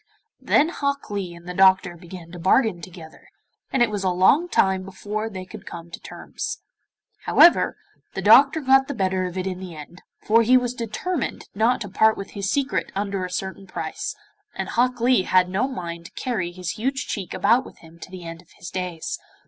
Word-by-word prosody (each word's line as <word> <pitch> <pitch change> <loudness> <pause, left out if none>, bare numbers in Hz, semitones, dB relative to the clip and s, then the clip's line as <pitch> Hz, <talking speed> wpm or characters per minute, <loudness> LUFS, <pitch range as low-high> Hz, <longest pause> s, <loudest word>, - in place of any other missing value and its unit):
Then 305 +3 +3
Hok 280 -7 -3
Lee 190 -4 -4
and 170 +1 -14
the 180 - -4
doctor 190 -1 +4
began 170 -1 -11
to 175 - -9
bargain 190 +1 +2
together, 165 -5 -12 0.4
and 255 - +3
it 230 - 0
was 205 -2 -3
a 190 - +2
long 190 - +3
time 190 - +2
before 210 +3 -5
they 185 -3 -7
could 185 - -12
come 170 0 -9
to - - -8
terms. - - -7 0.6
However, 340 - +5 0.4
the - - -2
doctor 285 +3 +6
got 270 0 +4
the 285 - -4
better 185 -2 0
of 180 0 -5
it 185 - -2
in 185 -1 -3
the 185 -3 -8
end, 155 +4 -11 0.2
for 230 +2 +3
he 250 +3 +5
was 250 -1 -1
determined 250 - -4
not 230 +5 +2
to 205 - -4
part 220 +3 +3
with 195 - -7
his 200 -1 -3
secret 275 +4 -1
under 200 -1 -2
a 180 - -4
certain 190 +1 -5
price, - - -5 0.4
and - - -4
Hok 250 +1 +1
Lee 245 -1 +4
had 185 -1 +3
no 200 +8 0
mind 170 -9 -6
to - - -11
carry 200 -9 -2
his 180 -1 -5
huge 260 +2 -1
cheek 195 -5 -5
about 235 +5 +3
with - - -14
him 165 0 -16
to - - -10
the 185 -1 -9
end 165 0 -8
of 175 - -27
his 170 - -9
days. 180 -3 -4
190 Hz, 205 wpm, -23 LUFS, 180-240 Hz, 0.6 s, doctor